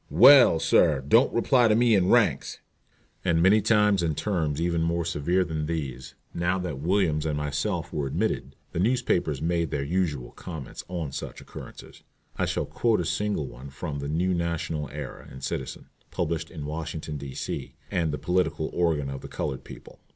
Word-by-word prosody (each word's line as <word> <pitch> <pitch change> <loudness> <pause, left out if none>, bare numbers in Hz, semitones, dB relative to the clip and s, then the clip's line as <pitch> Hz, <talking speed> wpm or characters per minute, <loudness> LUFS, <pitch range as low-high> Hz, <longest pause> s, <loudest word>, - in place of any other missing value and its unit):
"Well, 120 - +8
sir, 80 -3 +3
don't 115 - +5
reply 120 +1 +3
to 110 - +4
me 120 0 +4
in 95 -3 +3
ranks." - - +2 0.7
And 85 -3 +2
many 95 +5 +5
times 105 -2 +3
and 80 -3 -1
terms 80 -8 -1
even 85 0 0
more 85 0 0
severe 85 +3 +1
than 80 -2 -3
these. 65 -6 -4 0.2
Now 85 +2 0
that 90 -7 -4
Williams 80 -2 +1
and 75 -2 -1
myself 75 +5 -2
were 75 -2 -1
admitted, 65 0 -2 0.2
the - - -3
newspapers 95 - +1
made 85 0 0
their 70 - -2
usual 75 -5 -1
comments 80 -8 -8
on 85 -5 -4
such - - -6
occurrences. - - -11 0.3
I - - 0
shall - - -1
quote 115 -4 +1
a 90 - -1
single 105 -4 -1
one 65 +2 -10
from 70 +1 -5
The 70 0 -4
New 90 +4 +1
National 85 -3 -2
Era 75 -1 -8
and 65 - -11
Citizen, - - -4 0.2
published 85 -1 -2
in 80 -4 -7
Washington, 80 0 -5
D.C., 70 -1 -5 0.2
and 85 -3 0
the 75 - -2
political 90 -3 0
organ 80 -5 +1
of 70 -1 -5
the - - -8
colored 65 - -4
people. - - -12
80 Hz, 175 wpm, -26 LUFS, 75-90 Hz, 0.7 s, Well